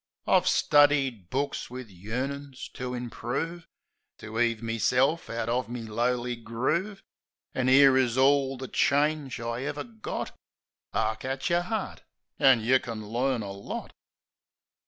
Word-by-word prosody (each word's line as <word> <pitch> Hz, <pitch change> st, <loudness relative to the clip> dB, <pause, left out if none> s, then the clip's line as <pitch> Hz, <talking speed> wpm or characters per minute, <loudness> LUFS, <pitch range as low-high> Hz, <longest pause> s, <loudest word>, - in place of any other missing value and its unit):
I've -, -, +3 dB
studied 140 Hz, -9 st, +3 dB
books 140 Hz, +2 st, -2 dB
wiv 125 Hz, -3 st, -8 dB
yearnin's 130 Hz, +8 st, -5 dB
to 125 Hz, 0 st, -5 dB
improve. 130 Hz, +8 st, -4 dB, 0.5 s
To 110 Hz, 0 st, -6 dB
'eave 115 Hz, -1 st, +1 dB
meself 125 Hz, +7 st, +1 dB
out 115 Hz, -1 st, -3 dB
of 120 Hz, 0 st, -1 dB
me 120 Hz, -1 st, -5 dB
lowly 120 Hz, +2 st, -1 dB
groove, 130 Hz, -, -2 dB, 0.5 s
An' 130 Hz, 0 st, +1 dB
'ere 135 Hz, 0 st, +7 dB
is 125 Hz, -2 st, +2 dB
orl 135 Hz, 0 st, +3 dB
the 130 Hz, +1 st, -6 dB
change 145 Hz, -3 st, +1 dB
I 115 Hz, +1 st, -3 dB
ever 145 Hz, +1 st, -3 dB
got: 225 Hz, -2 st, -6 dB, 0.3 s
" -, -, -67 dB
'Ark 110 Hz, 0 st, 0 dB
at 135 Hz, +4 st, -2 dB
yer 175 Hz, +1 st, +1 dB
'eart, 220 Hz, -3 st, -3 dB, 0.4 s
an' 130 Hz, -4 st, +6 dB
you 130 Hz, +4 st, +4 dB
kin 110 Hz, -5 st, -7 dB
learn 125 Hz, +1 st, 0 dB
the 100 Hz, -2 st, -5 dB
lot.' 100 Hz, +1 st, -7 dB
130 Hz, 140 wpm, -28 LUFS, 115-140 Hz, 0.5 s, ere